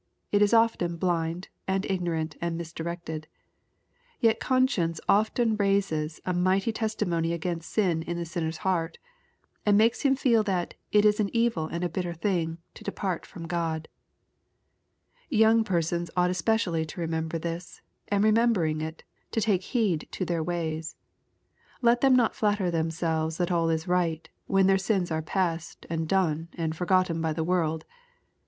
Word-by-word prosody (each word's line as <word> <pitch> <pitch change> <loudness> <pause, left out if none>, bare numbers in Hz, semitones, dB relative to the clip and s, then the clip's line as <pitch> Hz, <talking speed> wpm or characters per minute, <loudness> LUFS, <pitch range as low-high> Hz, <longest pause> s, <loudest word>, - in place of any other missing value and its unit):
It 205 - +3
is 205 - +4
often 225 -7 +3
blind, 170 0 -1 0.2
and 190 +1 0
ignorant, 170 -4 -1
and 170 -1 -1
misdirected. 165 -1 -5 0.9
Yet 225 -2 +3
conscience 235 - +1
often 220 +2 +3
raises 195 -6 0
a 185 - 0
mighty 190 +5 +2
testi 220 -2 -1
mony 165 -1 0
against 170 -1 -3
sin 180 -7 +1
in 170 +1 -4
the 170 - -3
sinner's 160 -1 -3
heart, 175 -3 0 0.7
and 205 -1 +4
makes 225 +2 +3
him 275 -2 +3
feel 240 -4 +3
that 190 -4 -1
" - - -48
it 210 0 +5
is 210 0 +4
an 205 -2 +1
evil 230 -9 +1
and 170 +2 -4
a - - +2
bitter 175 0 -3
thing" 165 -3 -1 0.2
to - - -12
depart 185 -4 -3
from 170 -2 -9
God. 165 -1 -2 1.4
Young 225 -2 +5
persons 170 -3 -1
ought 180 0 +3
especially 180 -3 +1
to 160 +3 -8
remember 160 0 -2
this, 170 +1 -6 0.2
and, 205 0 +2
remembering 215 -8 +3
it, 160 +1 -6 0.3
to - - -1
take 205 -4 +2
heed 195 -6 0
to 185 - -2
their 170 -1 -1
ways. 160 -1 -3 0.9
Let 240 0 +4
them 270 -1 +6
not 240 -3 +3
flatter 205 -4 +1
themselves 160 -1 -1
that 175 0 0
all 165 -1 +2
is 160 +2 -1
right, 170 -3 0 0.2
when 195 -1 +3
their 195 0 +4
sins 190 -3 0
are 160 0 0
past, 170 0 -2
and 160 -1 -2
done, 165 -4 +1
and 160 -2 -2
forgotten 180 -1 +1
by 160 -1 0
the 160 - -2
world. 160 -2 0
175 Hz, 160 wpm, -27 LUFS, 165-205 Hz, 1.4 s, them